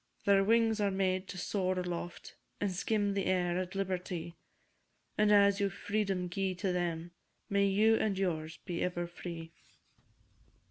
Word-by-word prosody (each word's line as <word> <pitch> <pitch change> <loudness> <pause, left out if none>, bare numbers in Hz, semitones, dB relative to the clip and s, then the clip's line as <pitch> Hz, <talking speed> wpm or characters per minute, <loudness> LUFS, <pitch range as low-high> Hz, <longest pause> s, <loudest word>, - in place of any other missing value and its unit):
Their 200 -1 +5
wings 225 +1 +3
were 205 -1 +2
made 190 -1 0
to 185 - -7
soar 185 0 -1
aloft, 175 -1 -5 0.2
And 205 -2 0
skim 205 +2 0
the 195 -1 -1
air 180 -1 +1
at 185 +1 -4
liberty; 180 -3 -3 0.8
And 210 0 +3
as 200 0 +5
you 200 -1 +2
freedom 195 -2 -1
gi'e 190 +1 -1
to 185 0 -1
them, 170 -1 -2 0.4
May 200 0 +3
you 215 +3 +4
and 205 -3 0
yours 160 -4 -2
be 175 -3 -3
ever 175 -1 -1
free! 170 -1 -7
190 Hz, 150 wpm, -32 LUFS, 175-200 Hz, 0.8 s, Their